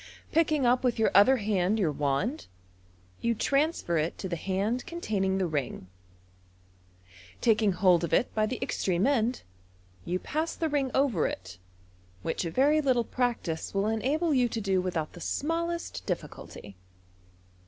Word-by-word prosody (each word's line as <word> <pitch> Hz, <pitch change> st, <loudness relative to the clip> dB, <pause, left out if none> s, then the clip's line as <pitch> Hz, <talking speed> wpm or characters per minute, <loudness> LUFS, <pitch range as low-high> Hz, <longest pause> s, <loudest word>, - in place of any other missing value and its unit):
Picking 310 Hz, -4 st, +2 dB
up 245 Hz, +2 st, +3 dB
with 250 Hz, -2 st, +1 dB
your 225 Hz, -, +2 dB
other 255 Hz, +7 st, +6 dB
hand 205 Hz, -2 st, +1 dB
your 180 Hz, -8 st, +1 dB
wand, 150 Hz, -, -1 dB, 0.7 s
you 235 Hz, 0 st, +1 dB
transfer 275 Hz, -, +1 dB
it 155 Hz, +2 st, -2 dB
to 190 Hz, -, -4 dB
the 175 Hz, -, -2 dB
hand 195 Hz, +8 st, -1 dB
containing 200 Hz, -, -1 dB
the 190 Hz, -, +1 dB
ring. 145 Hz, -, -3 dB, 1.5 s
Taking 220 Hz, -3 st, +3 dB
hold 180 Hz, -2 st, +4 dB
of 170 Hz, -, -2 dB
it 245 Hz, -, +2 dB
by 215 Hz, -1 st, +1 dB
the 255 Hz, -, -3 dB
extreme 185 Hz, +1 st, 0 dB
end, 250 Hz, -3 st, +1 dB, 0.6 s
you 180 Hz, -, -1 dB
pass 315 Hz, -, -3 dB
the 320 Hz, -, -1 dB
ring 280 Hz, -3 st, 0 dB
over 265 Hz, -, +2 dB
it, 95 Hz, -1 st, -7 dB, 0.6 s
which -, -, -2 dB
a -, -, -1 dB
very 290 Hz, -, +3 dB
little 255 Hz, -4 st, +2 dB
practice 230 Hz, -11 st, -2 dB
will 195 Hz, +1 st, +1 dB
enable 275 Hz, +10 st, 0 dB
you 250 Hz, -3 st, +3 dB
to 230 Hz, -, -3 dB
do 195 Hz, -3 st, +1 dB
without 170 Hz, -4 st, -3 dB
the 175 Hz, -, -11 dB
smallest 335 Hz, -, -2 dB
difficulty. 100 Hz, -2 st, -6 dB
220 Hz, 155 wpm, -28 LUFS, 180-270 Hz, 1.5 s, other